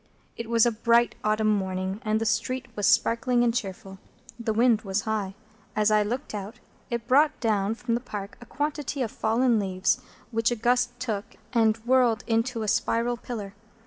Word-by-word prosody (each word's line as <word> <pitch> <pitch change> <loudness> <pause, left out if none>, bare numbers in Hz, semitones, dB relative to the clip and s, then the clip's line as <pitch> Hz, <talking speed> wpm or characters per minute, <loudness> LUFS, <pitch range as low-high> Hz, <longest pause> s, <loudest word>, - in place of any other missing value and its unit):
It 230 -1 -6
was 230 -1 +4
a 240 - +3
bright 235 +1 +3
autumn 215 0 +2
morning, 190 +1 -3
and 215 0 +1
the 225 - -2
street 240 +3 -1
was 205 - +1
sparkling 240 +1 +3
and 235 -1 +2
cheerful. 195 -4 -5 0.4
The 230 -1 -1
wind 230 0 +3
was 195 0 -1
high. 205 -2 -2 0.4
As 215 0 +3
I 215 0 +4
looked 240 +6 -3
out, 210 +3 -6 0.3
it 235 -2 -3
brought 295 +4 +4
down 215 -2 +1
from 235 0 -3
the 235 - 0
Park 205 -5 -7
a 240 - -12
quantity 290 -1 -2
of 225 - -4
fallen 230 +1 +2
leaves, 185 -2 0 0.3
which 225 0 +2
a 240 - 0
gust 245 +1 +1
took, 215 -5 -4 0.2
and 225 -2 +3
whirled 245 -3 +3
into 230 0 0
a - - -3
spiral 230 +3 +1
pillar. 220 -4 -7
225 Hz, 180 wpm, -26 LUFS, 210-245 Hz, 0.4 s, was